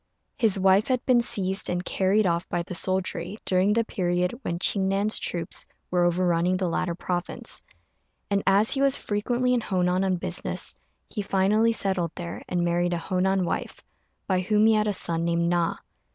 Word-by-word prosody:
His 220 Hz, -6 st, +2 dB
wife 190 Hz, +2 st, +4 dB
had 255 Hz, -1 st, 0 dB
been 250 Hz, -2 st, +4 dB
seized 195 Hz, -4 st, 0 dB
and 180 Hz, 0 st, -2 dB
carried 200 Hz, +3 st, +2 dB
off 170 Hz, 0 st, 0 dB
by 175 Hz, -1 st, -1 dB
the 175 Hz, -, -8 dB
soldiery 185 Hz, +1 st, -2 dB
during 190 Hz, +2 st, +2 dB
the 230 Hz, +1 st, +2 dB
period 180 Hz, -3 st, -1 dB
when 170 Hz, -8 st, -3 dB
Ching 190 Hz, +2 st, +1 dB
Nan's 200 Hz, +2 st, +1 dB
troops 170 Hz, -2 st, -4 dB, 0.2 s
were 175 Hz, -1 st, +2 dB
overrunning 175 Hz, 0 st, +1 dB
the 185 Hz, -1 st, -1 dB
latter 170 Hz, 0 st, -1 dB
province; 175 Hz, 0 st, -3 dB, 0.7 s
and 200 Hz, -1 st, +1 dB
as 200 Hz, +3 st, +4 dB
he 275 Hz, -, 0 dB
was 275 Hz, 0 st, +3 dB
frequently 240 Hz, +4 st, 0 dB
in 245 Hz, -, +1 dB
Honan 185 Hz, -2 st, 0 dB
on 190 Hz, -1 st, +1 dB
business, 175 Hz, -, -1 dB, 0.4 s
he 210 Hz, -, -3 dB
finally 205 Hz, +3 st, +2 dB
settled 190 Hz, -6 st, 0 dB
there 170 Hz, -1 st, -6 dB
and 175 Hz, -1 st, 0 dB
married 175 Hz, +1 st, +1 dB
a -, -, 0 dB
Honan 185 Hz, +2 st, 0 dB
wife, -, -, -4 dB, 0.4 s
by 185 Hz, -2 st, +1 dB
whom 210 Hz, +3 st, +2 dB
he 220 Hz, -, +5 dB
had 215 Hz, 0 st, +2 dB
a -, -, +2 dB
son 165 Hz, -3 st, -2 dB
named 170 Hz, 0 st, +1 dB
Na. 175 Hz, -1 st, +1 dB
185 Hz, 180 wpm, -25 LUFS, 175-205 Hz, 0.7 s, he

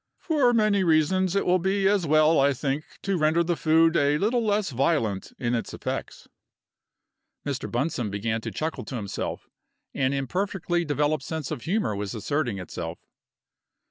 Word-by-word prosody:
"For 290 Hz, -7 st, +2 dB
many 215 Hz, -4 st, +3 dB
reasons 175 Hz, +3 st, +2 dB
it 200 Hz, -, +1 dB
will 180 Hz, +1 st, +3 dB
be 190 Hz, +2 st, +1 dB
as 195 Hz, -4 st, +2 dB
well, 155 Hz, +2 st, +4 dB
I 140 Hz, +1 st, +4 dB
think, 140 Hz, +3 st, -2 dB, 0.2 s
to 195 Hz, -3 st, 0 dB
render 155 Hz, +2 st, +3 dB
the 170 Hz, 0 st, 0 dB
food 160 Hz, +1 st, +3 dB
a 145 Hz, -1 st, +3 dB
little 230 Hz, +7 st, +1 dB
less 205 Hz, -4 st, 0 dB
violent 120 Hz, -, 0 dB
in 120 Hz, -1 st, -1 dB
its 115 Hz, -, -2 dB
effects." -, -, -5 dB, 1.2 s
Mr. 140 Hz, -2 st, -3 dB
Bunsome 120 Hz, -3 st, -1 dB
began 110 Hz, +3 st, -2 dB
to -, -, -4 dB
chuckle 160 Hz, +1 st, -3 dB
to 130 Hz, -, -6 dB
himself. 100 Hz, -4 st, -4 dB, 0.5 s
An 130 Hz, 0 st, +1 dB
imperfectly 175 Hz, +4 st, -1 dB
developed 150 Hz, -1 st, 0 dB
sense 160 Hz, -2 st, -4 dB
of -, -, -4 dB
humor 185 Hz, -, 0 dB
was 100 Hz, +1 st, -4 dB
asserting 120 Hz, -1 st, -1 dB
itself. 85 Hz, -2 st, -6 dB
155 Hz, 160 wpm, -26 LUFS, 130-185 Hz, 1.2 s, well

